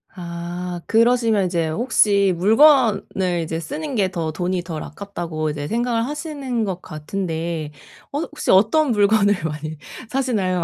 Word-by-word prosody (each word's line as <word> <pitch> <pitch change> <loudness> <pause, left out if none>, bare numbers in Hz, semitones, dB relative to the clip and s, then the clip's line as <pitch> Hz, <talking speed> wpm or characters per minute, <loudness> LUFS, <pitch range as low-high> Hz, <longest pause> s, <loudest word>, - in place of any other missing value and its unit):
아 175 0 -5
그러시면 230 -3 +3
이제 170 -3 0
혹시 200 +1 +3
물건을 210 - +3
이제 160 +1 -3
쓰는 295 - -5
게 195 -4 +2
'더 165 -3 -3
돈이 180 +2 -2
덜 165 -3 -5
아깝다.'고 165 -3 -5
이제 145 -1 -5
생각을 235 +2 0
하시는 285 -5 -3
것 185 -3 -3
같은데 160 -1 -4 0.4
어 285 - -2
혹시 305 -2 -5
어떤 245 +10 +4
물건을 205 -1 +4
많이 155 0 -4 0.3
사시나요? 210 -10 0
190 Hz, 290 characters per minute, -21 LUFS, 170-235 Hz, 0.4 s, 어떤